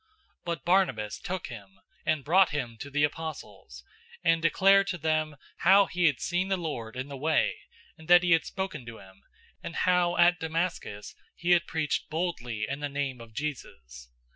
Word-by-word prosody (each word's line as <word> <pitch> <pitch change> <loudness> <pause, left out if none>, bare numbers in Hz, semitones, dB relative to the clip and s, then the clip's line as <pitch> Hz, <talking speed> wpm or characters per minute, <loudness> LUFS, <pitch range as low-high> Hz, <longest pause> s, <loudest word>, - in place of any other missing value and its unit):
009:027 440 - -40 0.4
But 170 -5 -4
Barnabas 150 - +1
took 185 -1 -4
him, 100 -5 -11 0.3
and 155 -3 +1
brought 185 +6 +4
him 130 -6 -4
to 140 - -7
the 145 +1 0
apostles, 145 - -5 0.4
and 165 -1 +3
declared 195 +4 +4
to 180 - -2
them 155 -1 -1 0.2
how 195 +3 +6
he 180 -1 -1
had 140 -4 +1
seen 180 +1 -1
the 195 -1 0
Lord 125 -10 -5
in 130 +2 -4
the 140 - -7
way, 155 +4 +1 0.5
and 160 - -14
that 175 0 +7
he 175 - +1
had 165 - +5
spoken 190 -8 -5
to 115 -1 -8
him, 95 0 -16 0.4
and 165 - -7
how 180 -1 +2
at 175 +1 +5
Damascus 160 - -3 0.2
he 175 - -1
had 175 -1 +4
preached 160 -3 -2
boldly 125 -10 -3
in 140 - -4
the 145 -1 -3
name 140 -3 -3
of 115 -2 -14
Jesus. 65 - -6
155 Hz, 185 wpm, -28 LUFS, 125-175 Hz, 0.5 s, that